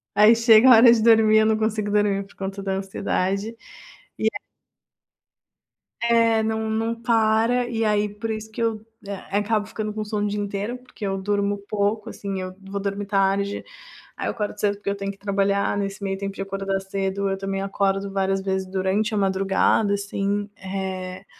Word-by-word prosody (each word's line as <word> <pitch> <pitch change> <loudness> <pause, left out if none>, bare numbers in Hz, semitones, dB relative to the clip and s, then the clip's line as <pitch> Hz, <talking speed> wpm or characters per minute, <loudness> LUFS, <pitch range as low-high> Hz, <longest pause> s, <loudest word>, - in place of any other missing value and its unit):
Aí 215 +2 +7
chega 230 +2 +6
a 245 - +10
hora 235 +1 +8
de 225 - +1
dormir, 220 -1 +6
eu 215 - +4
não 220 0 +2
consigo 215 -1 -1
dormir 205 -1 +2
por - - -20
conta 195 0 -5
da 195 -1 -2
ansiedade, 195 +2 -2 0.6
e, - - -1
eh - - -1 1.6
É, 230 -1 +3
não 220 0 -1
não 225 +1 -1
para, 230 +1 +2
e 225 -1 -1
aí, 210 0 +1
por 215 +2 -6
isso 220 0 -5
que 230 - -5
eu, 220 -1 -1 0.2
eh, 200 - -3 0.2
acabo 210 0 0
ficando 215 -1 -5
com 215 0 -3
sono 210 -1 -2
o - - 0
dia 210 - -2
inteiro, 205 +4 -3
porque 250 -4 -9
eu 195 0 -1
durmo 205 +1 0
pouco, 210 +2 -1
assim. 195 -2 -5
Eu 185 0 -6
vou 195 +1 -5
dormir 200 0 -3
tarde, 200 0 0 0.5
aí - - -3
eu - - 0
acordo 210 -2 -4
cedo 205 -1 +1
porque 200 0 -5
eu 200 - -1
tenho 200 0 -3
que 195 - -15
trabalhar, 200 0 0
nesse 195 0 -4
meio 195 -1 -2
tempo 195 0 -5
de - - -5
acordar 195 0 -2
cedo, 195 0 -2
eu 195 - -1
também 195 0 -3
acordo 195 0 -1
várias 195 0 0
vezes 190 -1 -2
durante 195 +4 0
a - - 0
madrugada, 195 +1 +2
assim. 200 0 -2
Eh, 190 0 -5
200 Hz, 190 wpm, -23 LUFS, 195-220 Hz, 1.6 s, a